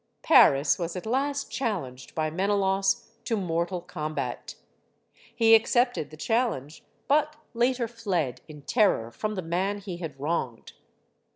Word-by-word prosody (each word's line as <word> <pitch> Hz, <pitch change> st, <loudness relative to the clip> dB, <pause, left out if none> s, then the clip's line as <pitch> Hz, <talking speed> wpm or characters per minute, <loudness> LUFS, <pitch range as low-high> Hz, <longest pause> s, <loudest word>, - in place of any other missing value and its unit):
Paris 140 Hz, +4 st, +5 dB
was 170 Hz, 0 st, -3 dB
at 180 Hz, -, -6 dB
last 275 Hz, +4 st, -1 dB
challenged 150 Hz, -, -4 dB
by 155 Hz, -1 st, -1 dB
Menelaus 195 Hz, +1 st, +1 dB
to 225 Hz, -, -1 dB
mortal 175 Hz, -1 st, -2 dB
combat. 150 Hz, -6 st, -5 dB, 0.8 s
He 225 Hz, -1 st, +5 dB
accepted 240 Hz, -, +3 dB
the 155 Hz, -, -12 dB
challenge, 220 Hz, -, -1 dB, 0.2 s
but 300 Hz, +1 st, +2 dB, 0.2 s
later 240 Hz, 0 st, +1 dB
fled, 195 Hz, -, -2 dB
in 150 Hz, -2 st, -12 dB
terror, 190 Hz, -, +2 dB
from 215 Hz, -, -3 dB
the 185 Hz, -, -4 dB
man 185 Hz, +5 st, -1 dB
he 190 Hz, -3 st, -7 dB
had 160 Hz, -6 st, -7 dB
wronged. 135 Hz, -6 st, -3 dB
190 Hz, 130 wpm, -27 LUFS, 155-225 Hz, 0.8 s, Paris